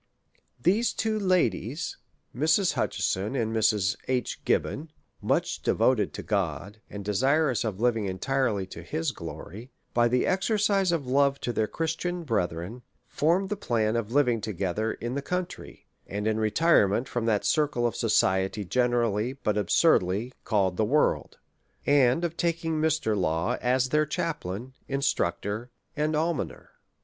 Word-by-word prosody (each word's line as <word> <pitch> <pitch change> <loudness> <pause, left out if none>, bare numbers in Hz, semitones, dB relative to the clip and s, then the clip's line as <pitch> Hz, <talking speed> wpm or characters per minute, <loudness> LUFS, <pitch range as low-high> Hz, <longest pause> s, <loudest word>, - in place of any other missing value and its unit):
These 200 - +2
two 220 -1 -1
ladies, 170 - 0 0.4
Mrs. 160 +7 +3
Hutcheson 100 +7 -1
and 115 -3 -1
Mrs. 105 -3 +2
H. 125 -1 -2
Gib - - +3
bon, 155 +3 -6 0.3
much - - 0
devoted 110 -7 +2
to - - -6
God, 100 +1 -2
and 100 -1 -7
desirous 130 +5 +2
of 105 -4 -3
living 115 -4 +1
en 95 - -4
tirely 125 -6 0
to - - -8
his 80 - -2
glory, 110 +8 -9 0.2
by 120 0 +4
the 125 +1 +1
exercise 200 -1 +2
of 165 -5 -1
love 140 +2 +2
to 120 - -2
their 110 -1 +1
Christian 165 +4 -3
brethren, 100 - -2 0.2
formed 175 +6 +1
the 210 - -1
plan 115 - 0
of 115 -1 -2
living 125 -5 +2
together 105 +2 -2
in 120 +1 -5
the 140 - -2
country, 180 +4 -5 0.2
and 105 +1 -4
in 110 0 +1
retirement 110 - +3
from 120 -2 -2
that 105 -3 +1
circle 145 -6 +1
of 115 -1 0
society 95 -2 +1
generally, 120 0 +1
but 110 -6 -2
absurdly, 105 - +2
called 95 -4 +1
the - - +2
world; 145 +8 +1 0.5
and 140 +2 +4
of 170 -1 -3
taking 165 -2 -1
TMr. 155 -9 +1
Law 90 +5 0
as 130 +1 +2
their 150 +1 +2
chaplain, 130 - -4
instructor, 115 -4 -1 0.3
and 150 +1 0
almoner. 160 -2 -2
120 Hz, 145 wpm, -27 LUFS, 105-155 Hz, 0.5 s, by